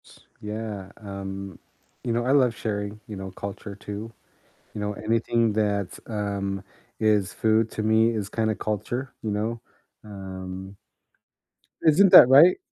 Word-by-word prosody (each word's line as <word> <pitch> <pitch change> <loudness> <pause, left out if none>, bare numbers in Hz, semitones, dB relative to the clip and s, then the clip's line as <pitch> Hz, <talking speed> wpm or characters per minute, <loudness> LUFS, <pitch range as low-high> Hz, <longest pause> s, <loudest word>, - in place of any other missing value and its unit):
S - - -18 0.2
yeah, 105 -2 -5
um, 100 -2 -7 0.4
you 120 - -2
know, 120 +1 0
I 130 - +2
love 130 -5 +4
sharing, 105 -1 -4
you 105 - -7
know, 95 0 -7
culture 100 +1 -7
too. 105 +2 -7 0.6
You 105 - -5
know, 105 0 -2
anything 115 +1 +1
that's, 100 -3 -1
um 100 -3 -3 0.4
is 105 -4 +2
food 110 +2 +2
to 110 - -3
me 110 +1 +4
is 105 -3 -3
kinda 110 +1 0
culture, 120 +5 -3
you 110 - -2
know? 110 +3 -2 0.4
Um 95 -1 -8 1.1
Isn't 175 +5 +5
that 125 - +10
right? 150 +7 +8
105 Hz, 140 wpm, -25 LUFS, 100-115 Hz, 1.1 s, that